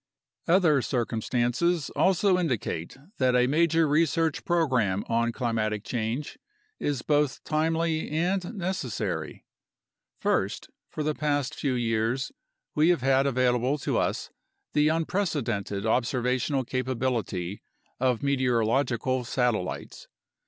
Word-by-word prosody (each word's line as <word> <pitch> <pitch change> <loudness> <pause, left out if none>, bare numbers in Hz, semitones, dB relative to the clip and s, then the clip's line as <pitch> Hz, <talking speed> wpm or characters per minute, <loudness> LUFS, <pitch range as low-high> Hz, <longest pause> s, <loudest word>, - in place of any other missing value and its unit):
Other 165 -5 +4
circumstances 125 +6 0
also 190 0 +3
indicate 120 - -2 0.2
that 130 -1 +3
a 125 0 +4
major 165 +3 +3
research 160 +1 +1
program 125 - +1
on 115 0 +1
climatic 110 -4 -1
change 120 - -3 0.4
is 140 -4 -2
both 145 -2 +1
timely 160 +1 0
and 175 +6 -1
necessary. 175 - -3 0.7
First, - - -1 0.2
for 155 - -4
the 155 +1 0
past 145 -1 -1
few 135 -4 -1
years 115 +2 0 0.4
we 155 +3 +4
have 175 -7 +3
had 135 +1 +3
available 125 +1 +2
to - - -1
us - - -2 0.4
the 150 0 +4
unprecedented 145 - -1
observational 125 +3 +1
capability 120 -8 -2 0.4
of 125 -1 +1
meteorological 130 -1 +1
satellites. 120 -5 -2
130 Hz, 105 wpm, -27 LUFS, 120-155 Hz, 0.7 s, Other